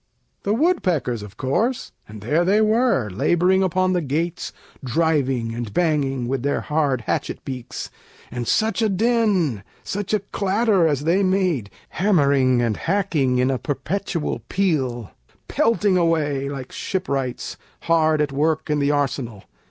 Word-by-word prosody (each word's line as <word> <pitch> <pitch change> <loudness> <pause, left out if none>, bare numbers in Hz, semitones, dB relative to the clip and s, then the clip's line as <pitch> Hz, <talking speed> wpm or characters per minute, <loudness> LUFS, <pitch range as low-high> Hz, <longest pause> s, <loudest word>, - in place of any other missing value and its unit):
The 205 +2 0
woodpeckers, 180 - +1
of 105 +1 -11
course: 225 - -1 0.2
and 105 0 -10
there 150 - +1
they 195 +4 +3
were, 220 - +2
Laboring 180 - +2
upon 185 0 +1
the 180 - +1
gates, 160 +4 -2 0.3
driving 135 -4 0
and 115 -2 -5
banging, 140 - 0
With 130 0 -1
their 140 +2 0
hard 145 -5 0
hatchet - - -3
beaks, 130 -3 -6 0.4
and 120 -1 -4
such 220 0 +1
a 220 - +2
din, 195 - +1 0.2
Such 205 0 -4
a 215 -2 +2
clatter, 200 -2 +1
as 145 -2 0
they 170 +5 +2
made, 185 - +1 0.2
hammering 140 -10 +2
and 110 -3 0
hacking, 165 -9 0
In 130 +1 +2
a 130 - -1
perpetual 160 +2 -3
peal, 130 - -1 0.4
pelting 210 -4 +2
away 150 -5 +1
Like 135 -2 -7
shipwrights, 140 -10 -3 0.2
hard 160 -2 +2
at 145 -2 0
work 155 +2 0
in 150 - +1
the 140 0 +1
arsenal. 130 -7 -1
155 Hz, 145 wpm, -22 LUFS, 130-190 Hz, 0.4 s, they